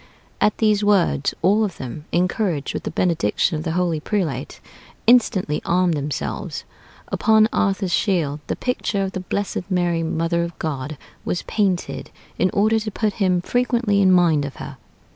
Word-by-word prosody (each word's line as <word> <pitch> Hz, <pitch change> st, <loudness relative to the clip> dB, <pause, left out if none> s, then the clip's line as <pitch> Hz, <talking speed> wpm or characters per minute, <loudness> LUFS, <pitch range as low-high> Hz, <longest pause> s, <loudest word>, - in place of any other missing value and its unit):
At 210 Hz, -, +3 dB
these 215 Hz, -2 st, +2 dB
words, 195 Hz, -8 st, +2 dB
all 205 Hz, +5 st, +4 dB
of 195 Hz, -5 st, -3 dB
them, 135 Hz, +4 st, -7 dB
encouraged 180 Hz, -4 st, 0 dB
with -, -, -5 dB
the -, -, -1 dB
benediction 165 Hz, -, +1 dB
of 155 Hz, -, -4 dB
the 160 Hz, -, -2 dB
holy 175 Hz, -3 st, 0 dB
prelate, 155 Hz, -, -3 dB, 0.5 s
instantly 210 Hz, -10 st, +3 dB
armed 180 Hz, 0 st, +2 dB
themselves.... 145 Hz, -2 st, -4 dB, 0.5 s
Upon 220 Hz, 0 st, +4 dB
[Arthur's 195 Hz, -2 st, 0 dB
shield] 160 Hz, -8 st, +1 dB
the -, -, -1 dB
picture 225 Hz, -5 st, -1 dB
of 190 Hz, -, -2 dB
the 190 Hz, -, -4 dB
blessed 195 Hz, 0 st, -3 dB
Mary, 175 Hz, -3 st, +1 dB
Mother 165 Hz, +1 st, 0 dB
of 170 Hz, 0 st, -6 dB
God, 145 Hz, -1 st, -4 dB, 0.3 s
was 175 Hz, -, -2 dB
painted, 195 Hz, -5 st, -1 dB, 0.3 s
in 185 Hz, -, +3 dB
order 215 Hz, +2 st, +2 dB
to 215 Hz, 0 st, -4 dB
put 215 Hz, 0 st, -1 dB
him 180 Hz, -2 st, +3 dB
frequently 235 Hz, -2 st, +1 dB
in 190 Hz, -1 st, +5 dB
mind 170 Hz, -5 st, +4 dB
of 140 Hz, -1 st, -6 dB
her.... -, -, -8 dB
180 Hz, 160 wpm, -22 LUFS, 160-205 Hz, 0.5 s, in